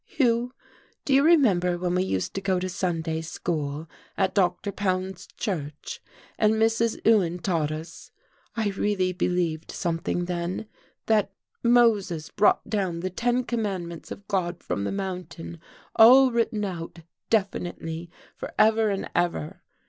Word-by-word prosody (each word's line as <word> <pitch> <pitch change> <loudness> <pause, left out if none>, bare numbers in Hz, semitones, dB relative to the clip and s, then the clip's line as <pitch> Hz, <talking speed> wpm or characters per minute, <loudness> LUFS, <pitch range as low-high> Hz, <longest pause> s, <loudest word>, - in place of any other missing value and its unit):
"Hugh, 240 -2 +1 0.5
do 275 - +1
you 270 - +6
remember 210 - +4
when 180 0 -1
we 180 - +2
used 95 - -1
to 195 - -3
go 190 -1 +1
to 185 - -2
Sunday 165 -4 -2
school 155 -2 -3 0.3
at 190 -1 +1
Dr. 185 0 +1
Pound's 185 -1 -2
church, 150 -8 -5 0.4
and 215 0 +4
Mrs. 225 +1 +1
Ewan 190 -6 +4
taught 165 -4 0
us? 155 +2 -8 0.5
I 220 -2 +1
really 195 -2 0
believed 175 -3 -1
something 170 0 -2
then 175 +3 -3 0.4
that 210 -3 +2 0.3
Moses 220 -9 +3
brought 205 - +3
down 185 -6 -1
the 185 +1 -3
ten 245 +6 0
commandments 190 -9 -3
of 200 - -9
God 175 -4 -2
from 100 - -2
the - - -1
mountain, 180 -4 -5 0.4
all 255 +4 +8
written 230 -2 0
out 170 -2 -6 0.3
definitely 175 -5 -2 0.3
for - - -7
ever 220 0 +4
and 195 -1 -2
ever. 175 0 -1
185 Hz, 140 wpm, -26 LUFS, 170-215 Hz, 0.5 s, all